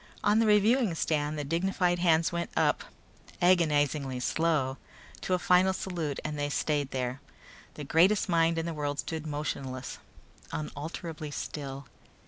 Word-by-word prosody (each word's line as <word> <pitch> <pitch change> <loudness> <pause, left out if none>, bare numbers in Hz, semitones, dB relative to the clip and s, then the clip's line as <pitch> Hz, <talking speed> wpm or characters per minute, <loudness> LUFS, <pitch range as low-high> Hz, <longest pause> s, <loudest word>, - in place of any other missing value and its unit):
On 210 +2 +4
the 225 - +3
reviewing 210 -1 +4
stand 150 -1 0
the 145 - -2
dignified 175 +3 0
hands 165 -2 +3
went 170 0 -2
up, - - +2 0.5
agonizingly 150 -7 +2
slow, 140 -1 0 0.4
to 185 - +1
a - - +1
final 180 +1 +4
salute 170 -7 -3
and 150 -1 -3
they 145 0 -1
stayed 145 -1 0
there. 125 0 -3 0.5
The 150 - -6
greatest 180 +10 +3
minds 165 -2 +2
in 165 - -2
the 170 - -3
world 145 -2 -2
stood 160 0 -4
motionless, 135 -3 -4 0.5
unalterably 155 +1 -5
still. 140 -1 -6
160 Hz, 140 wpm, -29 LUFS, 145-175 Hz, 0.5 s, On